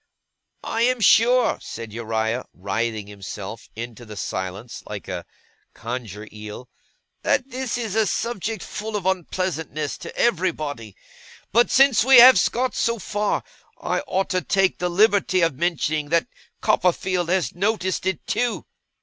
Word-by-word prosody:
'I 225 Hz, -, -2 dB
am 250 Hz, +1 st, +3 dB
sure,' 235 Hz, +3 st, +4 dB
said 115 Hz, -2 st, -8 dB
Uriah, 115 Hz, +1 st, -2 dB
writhing 105 Hz, +3 st, -2 dB
himself 100 Hz, +1 st, -8 dB
into 120 Hz, +1 st, -7 dB
the 105 Hz, -2 st, -10 dB
silence 95 Hz, +5 st, -5 dB
like 105 Hz, -2 st, -7 dB
a 90 Hz, -2 st, -5 dB, 0.5 s
Conger 115 Hz, -3 st, -6 dB
eel, 105 Hz, +3 st, -9 dB, 0.5 s
'that 265 Hz, +1 st, 0 dB
this 255 Hz, -1 st, -3 dB
is 225 Hz, -5 st, -3 dB
a 220 Hz, -1 st, +2 dB
subject 220 Hz, 0 st, -2 dB
full 215 Hz, +1 st, -5 dB
of 200 Hz, -3 st, -3 dB
unpleasantness 165 Hz, -5 st, -2 dB
to -, -, -9 dB
everybody. 155 Hz, -, -1 dB, 0.6 s
But 235 Hz, +1 st, +4 dB
since 270 Hz, -4 st, +5 dB
we 265 Hz, +1 st, +7 dB
have 240 Hz, -5 st, +10 dB
got 255 Hz, +2 st, -1 dB
so 235 Hz, 0 st, 0 dB
far, 210 Hz, 0 st, -1 dB, 0.4 s
I -, -, -1 dB
ought 190 Hz, -2 st, -1 dB
to 185 Hz, -, +1 dB
take 195 Hz, 0 st, +1 dB
the 180 Hz, -, 0 dB
liberty 195 Hz, 0 st, +3 dB
of 165 Hz, -3 st, +3 dB
mentioning 155 Hz, -3 st, 0 dB
that 170 Hz, +7 st, +2 dB, 0.3 s
Copperfield 180 Hz, -1 st, +1 dB
has 185 Hz, 0 st, +1 dB
noticed 190 Hz, -1 st, -1 dB
it 190 Hz, -3 st, -2 dB
too. 230 Hz, +2 st, -1 dB
180 Hz, 140 wpm, -23 LUFS, -, 0.6 s, have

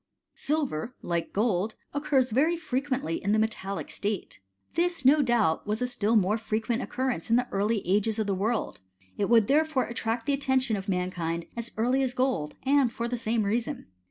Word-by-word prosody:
Silver, 255 Hz, -, -2 dB
like 170 Hz, -1 st, -2 dB
gold, 210 Hz, -1 st, 0 dB, 0.2 s
occurs 280 Hz, -3 st, +1 dB
very 310 Hz, +9 st, +3 dB
frequently 270 Hz, -, -2 dB
in 200 Hz, -, +2 dB
the -, -, +4 dB
metallic 215 Hz, -3 st, -2 dB
state. 205 Hz, -, -3 dB, 0.3 s
This, 340 Hz, -5 st, 0 dB
no 290 Hz, +3 st, +6 dB
doubt, 230 Hz, -, +1 dB
was 210 Hz, +1 st, -1 dB
a 250 Hz, -, 0 dB
still 230 Hz, -3 st, 0 dB
more 210 Hz, +1 st, +3 dB
frequent 225 Hz, +2 st, -1 dB
occurrence 255 Hz, -10 st, -2 dB
in 230 Hz, -, +5 dB
the 245 Hz, +1 st, +2 dB
early 205 Hz, +1 st, 0 dB
ages 210 Hz, +3 st, +2 dB
of 220 Hz, -, 0 dB
the 200 Hz, -, 0 dB
world; 210 Hz, +4 st, -1 dB, 0.4 s
it 200 Hz, -, +1 dB
would 230 Hz, -3 st, +6 dB
therefore 300 Hz, +1 st, +2 dB
attract 230 Hz, -1 st, -3 dB
the 285 Hz, -, +1 dB
attention 265 Hz, -4 st, +1 dB
of 195 Hz, 0 st, -5 dB
mankind 175 Hz, -3 st, -2 dB
as 235 Hz, 0 st, -5 dB
early 250 Hz, +4 st, +2 dB
as 255 Hz, -2 st, -1 dB
gold, 255 Hz, -, 0 dB
and 270 Hz, -2 st, +3 dB
for 235 Hz, 0 st, -3 dB
the 245 Hz, -, -2 dB
same 225 Hz, -1 st, 0 dB
reason. 235 Hz, +7 st, -2 dB
230 Hz, 185 wpm, -28 LUFS, 205-260 Hz, 0.4 s, no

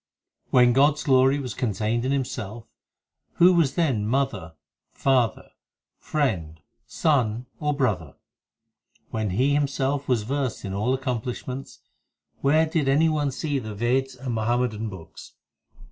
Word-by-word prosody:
5 -, -, -36 dB
When 125 Hz, -1 st, +6 dB
God 140 Hz, +3 st, +5 dB
s -, -, -6 dB
glory 135 Hz, -1 st, +4 dB
was 130 Hz, -5 st, -4 dB
contained 110 Hz, +2 st, -1 dB
in 130 Hz, -, 0 dB
Himself, 120 Hz, -5 st, -3 dB, 0.7 s
Who 180 Hz, +2 st, +6 dB
was 165 Hz, -6 st, +2 dB
then 130 Hz, -12 st, +1 dB
mother, 115 Hz, -10 st, -1 dB, 0.4 s
father, 130 Hz, -4 st, 0 dB, 0.5 s
friend, 90 Hz, -, -2 dB, 0.3 s
son, 125 Hz, -6 st, +1 dB
or 150 Hz, -1 st, 0 dB
brother? 100 Hz, -, -1 dB, 1.0 s
When 110 Hz, -2 st, -1 dB
He 130 Hz, +10 st, +1 dB
Himself 140 Hz, -1 st, 0 dB
was 120 Hz, -5 st, +1 dB
versed 135 Hz, 0 st, -3 dB
in 95 Hz, -, -4 dB
all 110 Hz, +7 st, +1 dB
accomplishments, 130 Hz, 0 st, -5 dB, 0.6 s
Where 155 Hz, +4 st, +3 dB
did 155 Hz, -3 st, 0 dB
any 155 Hz, +4 st, +4 dB
one 150 Hz, -2 st, 0 dB
see 140 Hz, +1 st, -2 dB
the 110 Hz, -4 st, -7 dB
Veds 130 Hz, +4 st, 0 dB
and 130 Hz, -2 st, -4 dB
Muhammadan 115 Hz, -1 st, -1 dB
books? 90 Hz, -5 st, -11 dB
130 Hz, 135 wpm, -25 LUFS, 110-140 Hz, 1.0 s, When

